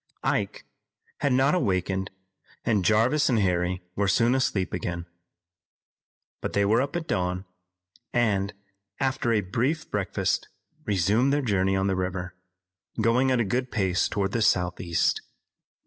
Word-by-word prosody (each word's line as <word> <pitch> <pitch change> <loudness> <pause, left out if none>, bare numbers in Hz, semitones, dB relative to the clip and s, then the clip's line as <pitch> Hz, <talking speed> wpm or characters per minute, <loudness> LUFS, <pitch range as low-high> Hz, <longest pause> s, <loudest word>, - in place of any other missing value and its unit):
Ike - - -1 0.5
had 140 - +1
not 135 +3 +3
awakened 95 - 0 0.6
and 110 -5 +2
Jarvis 120 +9 +3
and 120 - +3
Harry 90 -2 0
were 100 0 +1
soon 115 +5 +3
asleep 110 -8 0
again. 85 -1 -3 1.4
But - - -4
they 100 0 +2
were 110 +4 +3
up 140 +3 -3
at 175 -2 -2
dawn, 90 -1 -1 0.7
and, 100 -4 +1 0.5
after 130 -2 0
a 110 -2 +3
brief 130 - -1
breakfast, 100 -2 -1 0.4
resumed 105 +7 +2
their 145 0 +1
journey 95 -4 +1
on 95 0 +1
the 95 -1 +1
river, 90 0 -3 0.6
going 115 +4 +3
at 130 -2 +2
a - - 0
good 125 +5 -1
pace 95 -4 +1
toward 100 -1 -1
the 115 - -1
southeast. 90 -3 +1
100 Hz, 140 wpm, -26 LUFS, 95-125 Hz, 1.4 s, not